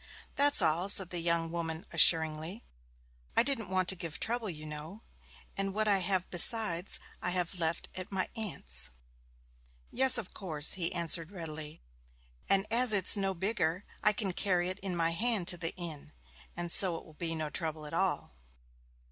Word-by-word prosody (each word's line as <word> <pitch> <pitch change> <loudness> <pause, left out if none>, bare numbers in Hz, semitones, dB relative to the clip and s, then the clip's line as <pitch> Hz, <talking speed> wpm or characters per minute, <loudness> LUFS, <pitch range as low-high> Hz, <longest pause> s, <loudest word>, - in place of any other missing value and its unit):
'That's 285 -8 +4
all,' 165 +4 +1
said 190 -3 +6
the 175 - +1
young 165 -1 0
woman 165 -1 -5
assuringly. 160 +4 +3 0.7
'I - - +5
didn't 235 -7 -3
want 185 -1 0
to 190 - +2
give 165 -3 -8
trouble, 230 -2 -2
you 155 -3 -7
know, 155 +8 -9 0.5
and 195 0 -3
what 215 0 0
I 200 -2 +2
have 185 -1 -1
besides 185 -1 +5 0.2
I - - -2
have 180 0 -3
left 165 0 -1
at 185 +1 -8
my 190 -1 -2
aunt's.' 70 - -1 1.0
'Yes, 260 -1 +6
of 220 -6 -6
course,' 160 -6 +1
he 175 -3 0
answered 170 -1 0
readily. 155 - -7 0.7
'And 195 0 +3
as 240 -1 +4
it's 195 -3 +5
no 195 -2 -1
bigger, 190 -1 -2 0.2
I 210 - +4
can 195 -2 -3
carry 180 -2 -1
it 185 +2 -6
in 190 -2 -4
my 165 -1 0
hand 210 0 +1
to 175 - -3
the 165 -1 -3
inn, 165 -5 -7 0.4
and 175 -1 -4
so 180 -2 +3
it - - -13
will 160 - -17
be 165 +1 -3
no 155 -1 -4
trouble 160 -2 -5
at 150 - -10
all.' 170 - -1
175 Hz, 175 wpm, -30 LUFS, 165-195 Hz, 1.0 s, said